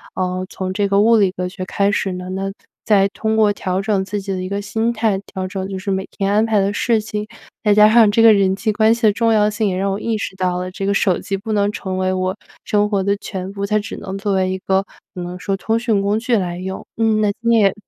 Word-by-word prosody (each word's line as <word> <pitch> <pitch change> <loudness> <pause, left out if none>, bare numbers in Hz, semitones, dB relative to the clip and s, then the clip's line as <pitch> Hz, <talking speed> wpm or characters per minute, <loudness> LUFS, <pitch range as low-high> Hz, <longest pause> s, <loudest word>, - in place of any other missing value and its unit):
呃， 185 0 -2
从 185 -1 -4
这 200 +1 0
个 200 0 +3
物 230 +2 +5
理 200 -3 +4
科 180 0 -4
学 185 0 -6
开 200 +2 +1
始 195 -1 -1
呢， 180 0 -6
那 190 +1 -3 0.4
再 200 -2 +4
通 220 +2 -2
过 215 -2 +4
调 185 -2 -2
整 200 -2 +1
自 200 +2 -4
己 195 0 -5
的 185 -1 -2
一 185 - -5
个 200 +1 -2
心 220 +3 -1
态， 220 -4 0
调 190 -1 -5
整 190 0 -4
就 195 -1 -5
是 195 +1 -3
每 190 0 -2
天 195 0 0
安 215 +1 +4
排 220 -2 +2
的 200 +1 +1
事 225 +2 +1
情， 210 0 -5 0.4
再 210 - +3
加 210 +1 +7
上 225 -3 +7
这 225 +2 +3
个 225 -1 +8
人 195 -2 +2
际 215 +2 -1
关 220 +1 +4
系 235 - -10
的 215 -2 +5
重 230 +1 +1
要 210 -1 +4
性， 210 0 0
也 185 -2 -1
让 195 +1 0
我 195 - -2
意 225 0 -1
识 200 - -5
到 180 -1 0
了 180 0 -4
这 195 +1 -4
个 200 - +2
手 185 -2 +2
机 195 - -3
不 220 +3 -6
能 205 -1 +1
成 190 -2 -4
为 185 0 +1
我 185 0 -1 0.3
生 210 0 +1
活 200 -2 0
的 200 +1 +1
全 190 -2 -6
部， 200 0 -5
它 215 +1 +2
只 210 0 -4
能 190 0 -6
作 200 0 -1
为 190 -1 +1
一 190 - -2
个 190 +1 0 0.3
可 180 - -6
能 175 +1 -6
说 195 +1 -1
通 220 +3 -1
讯 230 -4 +1
工 200 +2 +1
具 240 +1 0
来 180 -4 -1
用。 190 +1 -6
嗯， 220 -1 +2
那 210 -1 +2
今 235 0 +1
天 230 -1 +5
也 195 -2 +4
200 Hz, 300 characters per minute, -19 LUFS, 190-215 Hz, 0.4 s, 个